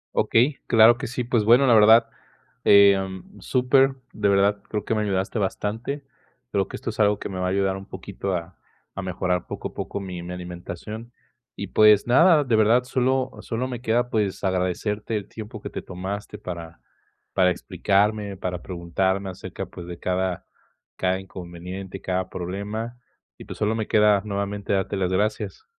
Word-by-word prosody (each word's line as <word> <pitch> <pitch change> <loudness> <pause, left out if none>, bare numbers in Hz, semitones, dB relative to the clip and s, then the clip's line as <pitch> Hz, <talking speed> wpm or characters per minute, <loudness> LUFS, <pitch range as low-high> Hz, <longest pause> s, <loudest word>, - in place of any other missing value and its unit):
Okey, 130 +5 +3
claro 115 0 +7
que - - -4
sí. 125 +1 -3
Pues, 120 -2 +1
bueno, 120 +5 +6
la 125 - +5
verdad, 110 +1 +7 0.6
eh, 100 -1 +8
mm, 95 +1 -7
súper, 130 +5 +3 0.2
de 105 -1 +1
verdad 100 +1 +3
creo 105 -2 -3
que - - 0
me 110 - +1
ayudaste 95 +1 -1
bastante. 110 +8 -3 0.5
Creo - - +1
que - - -8
esto - - -4
es - - -13
algo 105 -1 +4
que - - -6
me 95 -2 -5
va 90 - 0
a - - 0
ayudar 95 0 +1
un 95 - -9
poquito 95 0 -4
a 85 0 -6 0.4
a 100 - -3
mejorar 90 -1 -2
poco - - -5
a - - -20
poco - - -4
mi 90 -3 -6
mi 90 +1 -6
alimentación, 90 +6 -7 0.4
y, - - -4
pues, 105 -1 +5
nada, 155 +5 +5
de 125 -5 +1
verdad 110 +3 +4
solo 130 +1 0
solo 125 +2 -3
me 125 -2 -6
queda, 120 +1 +1
pues, 105 -5 -1
agradecerte 95 +4 -1
el 100 - -6
tiempo 110 0 -9
que - - -6
te - - -5
tomaste 95 +3 -6
para 85 -3 -8 0.5
para 90 -1 +4
explicarme, 100 +3 0
para 90 -2 -4
preguntarme 95 +2 -1
acerca, 90 - -7
pues, 85 - -10
de 85 -1 -7
cada 90 0 -2 0.5
cada 95 0 0
inconveniente, 95 +1 -8
cada 95 0 -2
problema. 105 +6 -5 0.4
Y, - - -10
pues, - - -8
solo 105 +1 +1
me 110 -1 -2
queda 105 -2 +4
nuevamente 100 0 -2
darte 95 +1 0
las 95 -2 0
gracias. 105 - -1
100 Hz, 180 wpm, -24 LUFS, 95-110 Hz, 0.6 s, eh